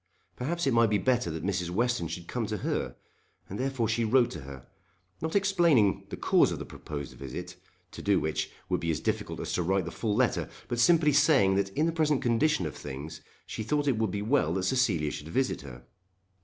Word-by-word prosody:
Perhaps 170 +6 -2
it 135 - +2
might 115 -1 +4
be 105 - +2
better 125 -2 +1
that 80 +1 -5
Mrs. 90 -3 -1
Western 120 0 0
should 85 +1 -7
come 120 -3 -2
to 105 0 -2
her; - - -2 0.5
and 100 - -6
therefore 130 -3 0
she 115 +2 0
wrote 120 +2 +3
to 80 - -6
her, 65 -2 -10 0.6
not 160 +3 -3
explaining 170 - +3
the - - -6
cause - - +3
of - - -3
the - - -6
proposed 70 -3 -7
visit, 65 -2 -7 0.4
to - - -8
do - - +3
which 80 -1 -2 0.2
would - - 0
be 85 - -3
as 80 - 0
difficult - - -2
as - - -4
to - - +1
write 95 +1 +1
the 85 - -5
full 105 +2 -2
letter, 125 0 +1 0.2
but 120 - -2
simply 155 +2 +5
saying 140 -10 +5
that 95 0 +1
in 155 - +3
the 165 - +1
present 155 -4 +1
condition 150 +6 +2
of - - -5
things 70 +4 -7 0.2
she - - -5
thought 145 +6 0
it 125 -6 +2
would 110 -2 +1
be 100 +2 -3
well 110 - +2
that 95 - -1
Cecilia 95 - +1
should 75 - -7
visit 130 +9 0
her. - - -11
110 Hz, 220 wpm, -29 LUFS, 85-135 Hz, 0.6 s, simply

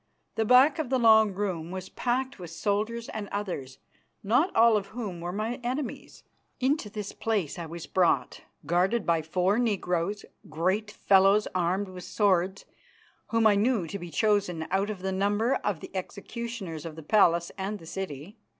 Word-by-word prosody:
The 220 - 0
back 260 +6 +6
of 300 -6 -2
the 260 - +2
long 220 -3 +6
room 185 -4 -3
was 185 +1 -6
packed 260 0 -2
with 175 -2 -8
soldiers 215 +6 -2
and 215 -2 -5
others, 175 -11 -4 0.5
not 245 - +3
all 230 0 +6
of 200 -2 -1
whom 205 -7 -6
were 175 +1 -3
my 215 +5 -3
enemies. 255 +3 -4 0.4
Into 260 -3 0
this 205 -1 -6
place 205 -9 -2
I 170 - -5
was 165 +1 -7
brought, 165 -9 +1 0.2
guarded 185 +7 +1
by 165 -1 +2
four 185 +7 +1
negroes, 195 -4 -1 0.2
great 185 +7 0
fellows 200 0 +4
armed 185 +2 0
with 180 -1 -9
swords 190 -2 +1 0.6
whom 230 -1 +1
I 215 - +7
knew 210 -1 +2
to 200 +5 -6
be 175 -1 -7
chosen 200 -5 +1
out 195 +2 +1
of 195 -3 -6
the 190 - -1
number 205 +6 +1
of 195 -6 -3
the - - -9
executioners 200 -3 -5
of 165 -2 -7
the 160 - -9
palace 170 -2 +3
and 195 +2 -3
the 165 - -14
city. 190 - -7
200 Hz, 170 wpm, -28 LUFS, 175-220 Hz, 0.6 s, I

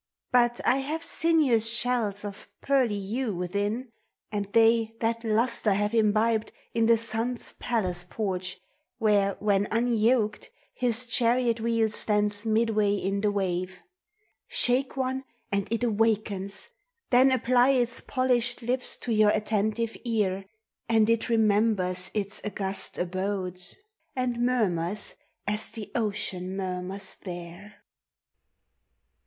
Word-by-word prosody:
I>nt 240 -1 +3
I 255 - +4
have 300 +4 -3
sinuous 285 -11 +3
shells 235 -4 0
of 200 -1 -8
pearly 255 -7 +1
hue 215 +2 -3
Within, 205 +7 -2 0.4
and 205 -1 -3
they 225 0 +3
that 230 +1 -1
lustre 225 -1 +3
have 205 +1 0
4 230 - +2
imbibed 220 +1 +1 0.2
In 230 -1 +2
the 230 0 +5
Sun's 230 +2 +1
palace 185 -7 -1
porch, 185 -1 -4 0.4
where 205 -3 +2
when 205 -1 +1
unyoked 230 -1 +1 0.2
His 245 0 0
chariot 235 0 +1
wheel 230 -1 +2
stands 210 0 +1
midway 215 -2 +2
in 200 0 -2
the 210 - +2
wave: 185 -2 -2 0.7
Shake 255 +2 +1
one 260 0 -1 0.3
and 200 -1 0
it 230 +1 -1
awakens, 210 -3 0 0.4
then 260 +2 +6
apply 250 0 +3
Its 245 -3 +3
polisht 245 -2 0
lips 250 +1 0
to 235 - -2
your 215 -1 +5
attentive 215 +2 0
ear 200 -5 -1 0.4
And 225 -1 +4
it 230 +1 0
remembers 205 -5 +1
its 205 0 -2
augusi 195 -2 -4
abodes. 185 0 -3 0.4
And 245 -2 -1
murmurs 205 -6 0 0.3
as 210 +1 -2
the 220 -3 -8
ocean 195 -4 -2
murmurs 190 +1 -4
there. 175 +3 -9
220 Hz, 120 wpm, -27 LUFS, 200-235 Hz, 0.7 s, then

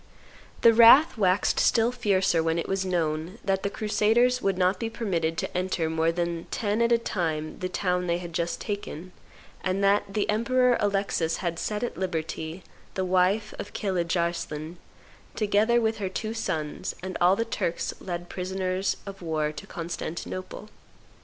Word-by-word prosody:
The 230 - +7
wrath 235 +8 +8
waxed 190 -3 +2
still 230 +1 +3
fiercer 195 -8 +2
when 165 0 0
it 170 - -2
was 195 0 0
know 165 -2 -1
that 195 -1 +1
the 200 - -1
crusaders 225 +4 +2
would 195 -2 0
not 185 +1 +2
be 230 - -2
permitted 170 -8 -1
to - - -3
enter 180 -3 -1
more 160 +1 +2
the 170 -1 -2
ten 210 +1 -1
at 235 0 +3
a 235 - +6
time 160 -8 -3
the 185 - -3
town 180 -1 -1
they 170 0 +1
had 175 -1 -8
just 170 0 -1
taken, 185 -4 -5 0.5
and 190 +1 0
that 200 0 +3
the 205 +1 0
Emperor 245 +3 +3
Alexis 195 -5 0
had 170 -2 -3
set 210 +2 -2
at 240 - -3
liberty 165 -1 -4 0.3
the 190 - 0
wife 185 +4 +2
of 205 - -7
Pilidge 180 -4 -1
Arslai 170 -1 -3 0.6
together 215 +3 +3
with 225 -1 0
her 195 -2 -2
two 215 +4 -4
sons 160 -9 -3
and 185 0 -5
all 180 +2 +6
the 230 - -1
Turks 170 -6 -2
led 175 -1 -5
prisoners 185 +1 -2
of 195 -1 -8
war 155 -3 -1
to 150 -1 -10
Constantinople. 175 +4 -6
185 Hz, 165 wpm, -26 LUFS, 170-210 Hz, 0.6 s, wrath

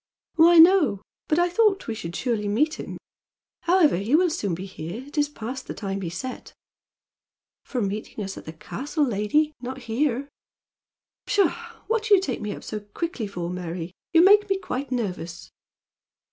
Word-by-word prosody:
"Why, 335 +1 +6
no; 325 - +6 0.2
but 310 - +2
I 350 0 +4
thought 390 +1 +2
we 225 - -1
should 170 -6 -6
surely 225 -5 -1
meet 285 +10 +1
him. - - -6 0.7
However, 340 - +4
he 210 +9 +1
will 355 +1 +4
soon 205 - -1
be 185 +3 -6
here. 185 +5 -7
It 290 - -13
is 295 -1 +2
past 260 -1 -6
the - - -5
time 195 -2 -4
he 175 - -3
set." 250 +10 -7 1.1
"For 245 -4 -2
meeting 210 +2 -4
us 195 0 -5
at - - -10
the 160 - -7
castle, 290 - -2
lady, 255 +7 +1
not 260 +1 -6
here." 250 +3 0 1.0
"Pshaw! 400 -4 +3 0.3
What 445 0 0
do 425 -3 +7
you - - +4
take 275 -10 -3
me 210 -1 -3
up - - -7
so 215 - -4
quickly 225 - -4
for, 180 -3 -5
Mary? 175 -1 -5 0.2
You 335 +1 +6
make 415 +1 +6
me 390 - +2
quite 275 -8 -4
nervous." 180 -8 -4
255 Hz, 175 wpm, -25 LUFS, 200-330 Hz, 1.1 s, do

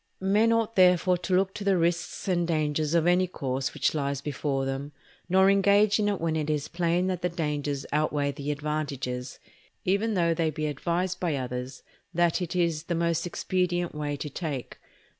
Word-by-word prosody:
Men 205 +4 +3
ought 230 0 +1
therefore 180 -1 +4
to 180 +1 0
look 190 +1 +2
to 205 - -6
the 195 -2 +3
risks 170 +3 -1
and 175 -2 +1
dangers 155 -1 0
of 165 -1 +3
any 180 +1 +3
course 135 -5 -3
which - - +1
lies 140 -2 -1
before 140 -1 -2
them, 135 +2 -4 0.4
nor 190 +1 +5
engage 200 +1 +4
in 205 -1 +2
it 200 - -1
when 165 -1 -1
it 155 -1 -1
is 150 -1 -1
plain 170 +1 0
that 185 -2 -2
the 180 - 0
dangers 150 -4 -2
outweigh 150 -1 +1
the 140 0 -6
advantages, 140 -4 -3 0.5
even 205 +4 +1
though 170 -2 +2
they 165 -1 0
be 155 0 -3
advised 170 +5 -1
by 170 -5 0
others 125 0 -5 0.3
that 175 +1 +2
it 180 +1 -3
is 170 -3 0
the 170 - -1
most 170 0 0
expedient 175 -1 -1
way 145 -1 -3
to 150 - -5
take. 145 -5 -5
165 Hz, 185 wpm, -27 LUFS, 145-180 Hz, 0.5 s, nor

